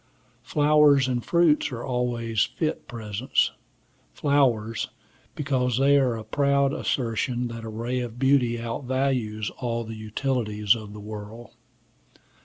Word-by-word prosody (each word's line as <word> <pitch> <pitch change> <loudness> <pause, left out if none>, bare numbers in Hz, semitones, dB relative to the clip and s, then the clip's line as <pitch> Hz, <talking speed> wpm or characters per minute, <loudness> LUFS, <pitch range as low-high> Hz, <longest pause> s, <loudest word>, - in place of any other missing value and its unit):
Flowers 145 +1 +4
and 125 -2 -1
fruits 170 -4 +3
are 120 -2 -5
always 120 -4 0
fit 155 -2 -3
presents; 110 +1 -1 0.6
flowers, 120 -7 +1 0.5
because 130 -5 0
they 140 +1 +4
are 125 -4 +1
a 110 - -7
proud 140 +4 +2
assertion 120 0 -1
that 115 -1 -7
a 110 - -6
ray 120 +3 -3
of 120 -1 -5
beauty 130 -2 +3
outvalues 120 -2 -2
all 115 -2 -2
the 115 0 -7
utilities 110 -1 0
of 110 -3 -7
the 105 - -9
world. 105 +2 -9
120 Hz, 125 wpm, -25 LUFS, 110-135 Hz, 0.6 s, Flowers